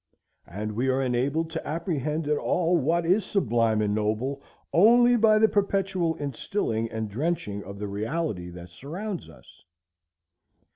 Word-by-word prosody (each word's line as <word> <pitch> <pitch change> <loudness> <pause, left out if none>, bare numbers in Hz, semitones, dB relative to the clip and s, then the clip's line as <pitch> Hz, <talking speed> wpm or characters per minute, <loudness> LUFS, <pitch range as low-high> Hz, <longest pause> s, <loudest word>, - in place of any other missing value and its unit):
And 105 +4 -5
we 120 +5 -1
are 130 0 +2
enabled 140 +6 0
to 160 - -5
apprehend 155 -1 -2
at 150 - +2
all 175 0 +1
what 165 +2 +1
is 190 +5 +3
sublime 115 - +1
and 105 -1 0
noble 110 +6 -1 0.3
only 240 +6 +6
by 220 -2 +5
the 220 +1 +5
perpetual 195 -5 0
instilling 135 - -2
and 110 -1 -3
drenching 105 -4 -2
of 100 +1 -9
the 105 +1 -4
reality 105 - -3
that 90 0 -10
surrounds 175 - -6
us. 65 -6 -18
145 Hz, 145 wpm, -26 LUFS, 110-175 Hz, 0.3 s, only